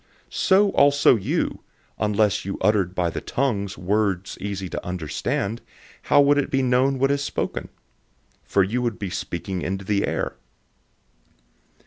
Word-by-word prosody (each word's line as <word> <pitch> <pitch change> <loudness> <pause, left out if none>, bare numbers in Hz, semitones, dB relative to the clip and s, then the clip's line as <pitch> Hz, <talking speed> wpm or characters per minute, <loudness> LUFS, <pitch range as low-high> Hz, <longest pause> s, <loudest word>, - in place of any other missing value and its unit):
014:009 - - -18
So 200 +1 +4
also 140 -4 +5
you, 105 - -1 0.4
unless 105 -1 +1
you 95 - -4
uttered 95 -4 +1
by 90 -2 0
the - - -4
tongue 115 -7 -1
words 95 -1 -1
easy 95 -2 -4
to - - -5
understand, 90 +5 -3 0.4
how 145 - +4
would 145 0 +4
it 140 - -1
be 135 -1 +1
known 130 +2 +2
what 135 +2 +2
is 140 0 0
spoken? - - -3 0.7
For 100 - +2
you 115 +7 -1
would 120 -3 -1
be 100 -3 -5
speaking 90 0 -4
into 95 +2 -3
the 100 0 +1
air. - - -2
105 Hz, 150 wpm, -23 LUFS, 95-135 Hz, 0.7 s, also